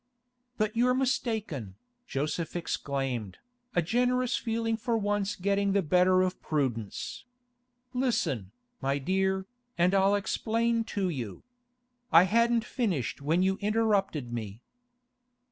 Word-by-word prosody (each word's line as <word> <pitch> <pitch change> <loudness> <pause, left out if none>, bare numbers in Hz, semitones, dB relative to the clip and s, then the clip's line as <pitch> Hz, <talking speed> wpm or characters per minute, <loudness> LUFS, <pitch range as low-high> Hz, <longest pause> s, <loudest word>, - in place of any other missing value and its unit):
'But 215 0 0
you're 250 +2 +3
mistaken,' 220 - -1 0.3
Joseph 155 +4 -2
exclaimed, 135 - -2 0.4
a 175 - +3
generous 250 +5 +1
feeling 225 -1 -1
for 230 +1 -1
once 205 -1 0
getting 200 +1 +1
the 200 -1 +2
better 185 +3 +4
of 185 0 -2
prudence. 125 - -2 0.7
'Listen, 230 - 0 0.3
my 135 +1 +1
dear, 190 +5 0 0.3
and 175 +2 +3
I'll 195 +1 +4
explain 230 +3 0
to 200 -4 -1
you. 120 - -5 0.7
I 165 +2 +8
hadn't 230 +3 +3
finished 185 - -2
when 160 +6 +2
you 190 +1 +1
interrupted 200 - +1
me. 110 -1 -5
190 Hz, 115 wpm, -29 LUFS, 145-225 Hz, 0.7 s, I